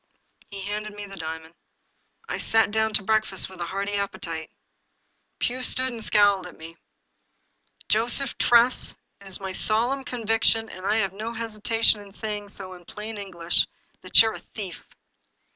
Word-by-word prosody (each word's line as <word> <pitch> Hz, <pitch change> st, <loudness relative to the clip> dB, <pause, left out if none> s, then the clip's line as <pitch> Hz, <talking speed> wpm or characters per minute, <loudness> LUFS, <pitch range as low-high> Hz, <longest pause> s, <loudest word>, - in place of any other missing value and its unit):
He 200 Hz, -1 st, -7 dB
handed 210 Hz, +1 st, -4 dB
me 205 Hz, 0 st, -6 dB
the 195 Hz, -1 st, -9 dB
diamond. 160 Hz, -1 st, -6 dB, 0.7 s
I -, -, -3 dB
sat 225 Hz, -2 st, +3 dB
down 220 Hz, +1 st, +1 dB
to 210 Hz, -, +3 dB
breakfast 215 Hz, -2 st, +1 dB
with 185 Hz, -2 st, -11 dB
a 170 Hz, -, -2 dB
hearty 200 Hz, +2 st, -3 dB
appetite. 170 Hz, -5 st, -3 dB, 0.9 s
Pugh 255 Hz, +1 st, -1 dB
stood 255 Hz, 0 st, +1 dB
and 230 Hz, -2 st, -4 dB
scowled 200 Hz, -4 st, +4 dB
at 175 Hz, -, -13 dB
me. 165 Hz, +1 st, -9 dB, 0.6 s
" -, -, -32 dB
Joseph 235 Hz, +4 st, 0 dB
Tress, 240 Hz, +1 st, +4 dB, 0.2 s
it 200 Hz, -, -14 dB
is 190 Hz, -, -5 dB
my 190 Hz, -1 st, -4 dB
solemn 240 Hz, +8 st, +1 dB
conviction, 225 Hz, -2 st, +1 dB
and 185 Hz, +1 st, -6 dB
I 210 Hz, -, +3 dB
have 195 Hz, -4 st, +1 dB
no 220 Hz, +4 st, -5 dB
hesitation 225 Hz, -1 st, +2 dB
in 200 Hz, -1 st, -13 dB
saying 210 Hz, 0 st, -4 dB
so 190 Hz, -2 st, -6 dB
in 175 Hz, -1 st, -13 dB
plain 210 Hz, +2 st, -7 dB
English, 175 Hz, -4 st, +1 dB, 0.3 s
that 185 Hz, -, +6 dB
you're 220 Hz, -1 st, 0 dB
a -, -, -7 dB
thief." 195 Hz, -5 st, -8 dB
205 Hz, 165 wpm, -25 LUFS, 190-225 Hz, 0.9 s, that